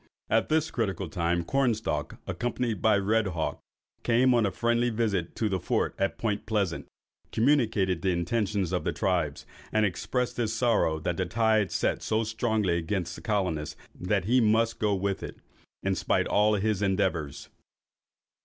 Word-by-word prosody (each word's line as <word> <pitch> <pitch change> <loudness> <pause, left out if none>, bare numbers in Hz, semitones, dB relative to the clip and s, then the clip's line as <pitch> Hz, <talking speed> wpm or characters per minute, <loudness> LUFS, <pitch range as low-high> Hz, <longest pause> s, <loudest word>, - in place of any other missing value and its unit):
At 110 +1 +2
this 155 0 +1
critical 95 -6 -2
time, 85 +1 0
Cornstalk, 110 - 0
accompanied 120 -4 -2
by 110 -2 +4
Red 105 +2 +1
Hawk, 85 -4 -2 0.4
came 125 +2 +3
on 115 -3 +3
a - - -2
friendly 120 +2 +1
visit 105 -7 -1
to 110 - 0
the 95 -2 -1
Fort - - 0
at 100 0 0
Point 105 -3 -2
Pleasant, 100 -6 -1 0.4
communicated 110 - +2
the 95 - +1
intentions 95 +1 0
of 90 - -1
the - - -1
tribes, 85 -6 -1 0.3
and 110 0 +3
expressed 120 +6 -2
his 115 -2 0
sorrow 110 -9 +2
that 85 +2 -2
the 95 - -1
tide 110 0 +2
set - - 0
so 110 +1 0
strongly 110 -5 0
against 85 +1 -2
the - - -10
colonists, 90 -8 -1 0.2
that 90 +1 -1
he 125 +4 +4
must 115 +1 +2
go 105 -2 +2
with 100 0 -2
it, - - -7 0.5
in 95 - +1
spite 95 - +1
of - - -5
all 105 +1 +4
his 105 0 0
endeavours. 95 -8 -1
105 Hz, 165 wpm, -28 LUFS, 90-115 Hz, 0.5 s, by